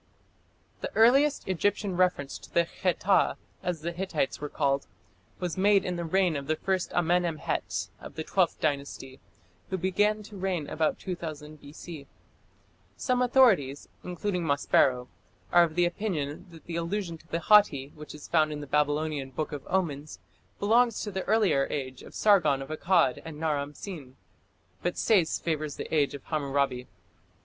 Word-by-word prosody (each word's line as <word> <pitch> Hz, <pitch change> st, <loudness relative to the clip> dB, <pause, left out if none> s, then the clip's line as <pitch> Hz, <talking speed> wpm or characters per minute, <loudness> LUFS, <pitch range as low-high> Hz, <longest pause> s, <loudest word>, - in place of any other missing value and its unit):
The -, -, -5 dB
earliest 275 Hz, +6 st, +4 dB
Egyptian 190 Hz, +1 st, 0 dB
reference 180 Hz, -6 st, 0 dB
to -, -, -15 dB
the 170 Hz, -, +3 dB
Kheta, 185 Hz, +2 st, +1 dB, 0.2 s
as 180 Hz, -4 st, -3 dB
the 170 Hz, +2 st, -3 dB
Hittites 170 Hz, -7 st, -2 dB
were 150 Hz, -, -4 dB
called, 140 Hz, -1 st, 0 dB, 0.5 s
was 180 Hz, 0 st, -3 dB
made 200 Hz, 0 st, +4 dB
in 180 Hz, -, -2 dB
the 170 Hz, -, -3 dB
reign 180 Hz, 0 st, +2 dB
of 140 Hz, -1 st, -4 dB
the 155 Hz, -, +1 dB
first 190 Hz, +2 st, -1 dB
Amenemhet 175 Hz, -2 st, 0 dB
of -, -, -11 dB
the 160 Hz, -, -3 dB
Twelfth 185 Hz, +1 st, +1 dB
Dynasty, 140 Hz, -3 st, -3 dB, 0.5 s
who 190 Hz, -, -1 dB
began 205 Hz, +4 st, +1 dB
to 210 Hz, 0 st, -12 dB
reign 185 Hz, -5 st, -2 dB
about 160 Hz, -1 st, 0 dB
2000 155 Hz, -4 st, -7 dB
B.C. 145 Hz, 0 st, -10 dB, 0.9 s
Some 250 Hz, -1 st, 0 dB
authorities, 225 Hz, -, +3 dB
including 180 Hz, 0 st, -2 dB
Maspero, 135 Hz, -4 st, +2 dB, 0.4 s
are 175 Hz, -1 st, +7 dB
of 160 Hz, 0 st, -8 dB
opinion 175 Hz, -2 st, -1 dB
that 165 Hz, -2 st, -15 dB
the 170 Hz, -1 st, -4 dB
allusion 170 Hz, -1 st, -3 dB
to 165 Hz, -, -22 dB
the 170 Hz, 0 st, -2 dB
Hatti 165 Hz, -11 st, +5 dB
which 150 Hz, 0 st, -10 dB
is 150 Hz, -, -10 dB
found 155 Hz, -2 st, +2 dB
in 150 Hz, -, -4 dB
the -, -, -6 dB
Babylonian 150 Hz, -1 st, 0 dB
Book 150 Hz, +4 st, -4 dB
of 145 Hz, -2 st, -6 dB
Omens 155 Hz, -6 st, -2 dB, 0.4 s
belongs 230 Hz, +2 st, +3 dB
to 210 Hz, -, -4 dB
the 190 Hz, 0 st, -2 dB
earlier 185 Hz, -12 st, +3 dB
age 130 Hz, -3 st, -4 dB
of -, -, -13 dB
Sargon 175 Hz, -10 st, +4 dB
of 135 Hz, -, -12 dB
Akkad 165 Hz, -3 st, +2 dB
and 160 Hz, -2 st, -8 dB
Naram 145 Hz, -2 st, -1 dB
Sin, 150 Hz, -10 st, -8 dB, 0.7 s
but 175 Hz, -, -2 dB
Sayce 185 Hz, -8 st, +3 dB
favours 155 Hz, -3 st, -2 dB
the -, -, -7 dB
age 145 Hz, -3 st, +2 dB
of 140 Hz, -, -10 dB
Hammurabi. 140 Hz, -4 st, -1 dB
165 Hz, 160 wpm, -28 LUFS, 145-190 Hz, 0.9 s, are